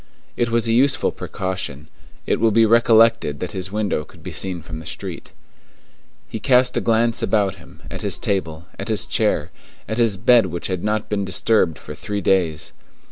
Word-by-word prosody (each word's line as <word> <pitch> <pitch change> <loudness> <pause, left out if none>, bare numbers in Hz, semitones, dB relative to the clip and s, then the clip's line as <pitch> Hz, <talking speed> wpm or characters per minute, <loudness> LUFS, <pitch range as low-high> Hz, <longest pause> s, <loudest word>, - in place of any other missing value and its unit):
It 120 -1 0
was 115 0 +1
a 115 - +2
useful 135 +3 +2
precaution; 95 -6 -5 0.4
it - - 0
will 115 - +4
be 115 +1 +4
recollected 115 -9 +4
that 90 - -4
his 95 -2 -5
window 105 -7 -1
could - - -18
be - - -6
seen 90 -4 -4
from 80 -1 -8
the 80 - -11
street. - - -7 1.0
He 110 - -6
cast 125 +1 +3
a - - +1
glance 115 0 +2
about 100 -3 +1
him, 85 - -17
at - - -6
his - - 0
table, 85 -5 -2
at - - -5
his 110 -4 +2
chair, - - 0 0.4
at 110 +2 -3
his 115 -4 +2
bed 115 0 +4
which 85 0 -5
had 90 -2 -3
not 105 0 -1
been 105 -1 -1
disturbed 95 -3 +2
for - - -9
three 105 0 -4
days. 85 -6 0
105 Hz, 190 wpm, -21 LUFS, 90-115 Hz, 1.0 s, will